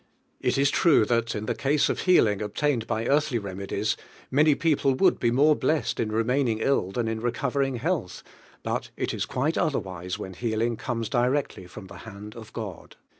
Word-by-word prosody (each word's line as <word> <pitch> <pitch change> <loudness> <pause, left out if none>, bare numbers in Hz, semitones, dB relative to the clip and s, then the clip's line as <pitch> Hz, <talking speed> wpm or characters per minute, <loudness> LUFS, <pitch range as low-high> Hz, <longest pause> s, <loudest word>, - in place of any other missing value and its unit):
It - - 0
is 140 0 +3
true 155 - +4
that 115 0 0
in 105 0 -3
the - - 0
case 145 +2 +1
of - - -1
healing 110 - +3
obtained 115 +3 -1
by 110 +1 -1
earthly 145 -2 +2
remedies, 100 -2 -2 0.4
ninny 150 +2 +4
people 145 -5 +2
would - - +3
be 120 - +2
more 145 +6 +4
blest 155 +1 0
in 110 -2 -1
remaining 115 +1 +1
ill 110 -4 +1
than 115 +3 -1
in 110 0 -2
re 120 0 0
covering 135 +1 -1
health, 150 - -2 0.4
but - - -2
it - - -2
is - - -2
quite 145 +6 -1
otherwlsu 95 - -2
when 95 - -7
healing 115 +3 -1
comes 115 -1 -3
directly 125 -6 0
from 95 +2 -10
tie 95 - -11
hand 105 +2 -10
'if 110 -2 -10
Ood. 105 -6 -7
120 Hz, 185 wpm, -26 LUFS, 105-140 Hz, 0.4 s, true